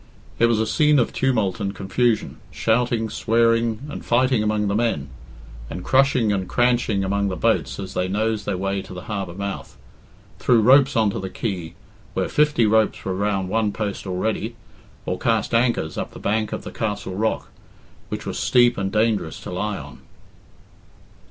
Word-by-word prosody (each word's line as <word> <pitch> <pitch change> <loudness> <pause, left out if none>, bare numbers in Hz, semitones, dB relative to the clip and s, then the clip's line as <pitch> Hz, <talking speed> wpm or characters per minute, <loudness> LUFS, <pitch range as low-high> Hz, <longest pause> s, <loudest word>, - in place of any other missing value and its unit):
It 115 - +5
was 115 -2 +2
a 110 - +2
scene 150 +6 +3
of 120 - +1
tumult 110 -8 0
and 100 -1 -3
confusion 110 +4 0
shouting, 115 0 +1
swearing, 115 +1 +1
and 150 - -7
fighting 125 -1 +2
among 105 -1 0
the 100 - 0
men, 105 -11 0 0.6
and 90 - -6
crushing 130 -3 +3
and 95 -2 -2
cranching 120 -5 +2
among 100 +1 0
the 95 - -2
boats - - 0
as 95 -2 -6
they 90 - 0
nosed 105 +2 -1
their 100 -3 -1
way 95 +1 -1
to 95 - -10
the 90 - -7
harbour 100 -5 -4
mouth, 100 0 -5 0.6
threw 120 -2 +4
ropes 130 +4 +5
on 110 -3 +3
to - - -4
the 95 - -5
quay, 90 -6 -4 0.4
where - - 0
fifty 150 -6 +3
ropes 110 0 +2
were 95 - -1
round 95 -1 -1
one 110 0 +1
post 100 -2 -4
already, 110 +5 -2 0.5
or - - -2
cast - - 0
anchors 115 -9 +1
up - - -5
the - - -9
bank 110 +1 0
of - - -4
the - - -7
castle 105 -3 -3
rock, 110 +4 -1 0.6
which - - -5
was - - -4
steep 120 -2 +4
and 95 0 -2
dangerous 105 -7 0
to - - -7
lie 100 +3 -2
on. 70 -2 -10
110 Hz, 175 wpm, -22 LUFS, 95-115 Hz, 0.6 s, It